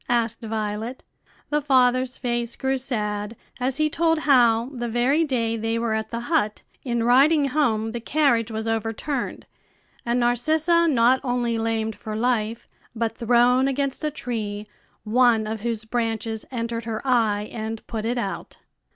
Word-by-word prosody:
asked 235 -1 0
Violet. 220 +2 -4 0.5
The 295 0 +2
father's 255 -2 +2
face 240 -1 -2
grew 265 0 -1
sad 210 -4 -3 0.2
as 255 +1 0
he 310 0 +3
told 325 +1 +1
how, 245 -5 +3
the 240 -2 -4
very 250 +7 +2
day 235 -6 0
they 225 +1 -1
were 230 -1 -1
at 220 0 -2
the 235 0 -4
hut, 240 -6 0 0.2
in 235 -3 -1
riding 275 +4 +4
home 225 -7 +1
the 235 - -4
carriage 240 -3 +2
was 220 0 -4
overturned, 225 +4 -3 0.6
and 240 +1 0
Narcissa 315 +8 +2
not 255 -3 +4
only 245 -3 0
lamed 225 -1 -1
for 215 -1 -6
life, 225 -1 -1 0.3
but 225 0 -1
thrown 245 +2 +3
against 275 +1 -2
a 305 - +1
tree, 215 -7 -4 0.4
one 230 0 +3
of 215 0 -4
whose 225 -1 -3
branches 225 -1 -2
entered 230 -2 -3
her 225 +2 -4
eye 215 -4 +2
and 220 -1 -5
put 220 -2 -4
it 240 +3 -1
out. 200 -5 -4
235 Hz, 155 wpm, -24 LUFS, 225-260 Hz, 0.6 s, riding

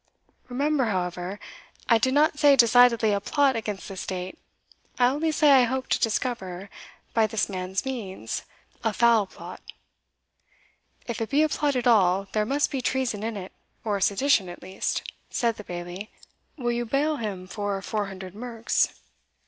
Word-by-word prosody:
Remember, 280 +2 +1
however, 180 -1 -3 0.5
I 230 -2 +5
did 260 +4 +1
not 300 0 +3
say 290 -2 +7
decidedly 235 -3 +5
a 200 - 0
plot 275 +4 +2
against 210 -3 -4
the 195 - -7
state 185 0 -5 0.6
I 245 - +4
only 295 +6 +1
say 305 -1 +4
I 260 -3 +7
hope 260 +2 -3
to - - +2
discover, 200 -5 -2 0.4
by 225 -2 +3
this 220 0 0
man's 185 +1 -3
means, 200 - -4 0.4
a 225 - +1
foul 230 -4 +4
plot." - - -10 1.4
"If 235 -2 -4
it 225 - -2
be 295 +2 +3
a 310 - +2
plot 290 -1 0
at 250 -1 -1
all, 195 -5 +4
there 215 -1 0
must 280 +3 +1
be 270 -3 -2
treason 250 -5 -1
in 220 0 -3
it, 190 -1 -7 0.3
or 205 -3 -1
sedition 200 0 +3
at 175 - -10
least," 190 +1 -2 0.3
said 235 -3 0
the 210 - -8
Bailie 175 +3 -7 0.5
"Will 240 -3 -1
you 240 0 -1
bail 295 +5 +1
him 200 -6 -4
for 200 +1 -3
four 210 -1 -2
hundred 190 -1 -8
merks?" 230 +1 -1
225 Hz, 165 wpm, -26 LUFS, 195-260 Hz, 1.4 s, say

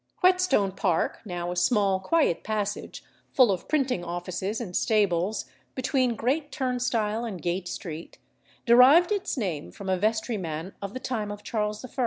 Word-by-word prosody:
Whetstone 365 - +3
Park, 180 -3 0
now 175 -2 -4
a - - -4
small 195 0 +2
quiet 240 - +1
passage, 210 -1 -3 0.3
full 250 -6 +5
of 185 - -3
printing 260 - 0
offices 180 +4 -3
and 190 -7 -6
stables, 205 -2 +1 0.3
between 255 -2 +1
Great 280 +6 -1
Turnstile 245 -5 -1
and 210 -6 -5
Gate 175 +3 -2
Street, 165 -2 -7 0.5
derived 265 - +7
its 390 -6 -1
name 175 - -3
from 195 -1 -7
a 185 -1 +1
vestryman 200 -6 -2
of 200 +2 -6
the - - -3
time 220 -5 -3
of 205 0 -8
Charles 210 +1 -2
I. - - -10
210 Hz, 155 wpm, -26 LUFS, 185-255 Hz, 0.5 s, derived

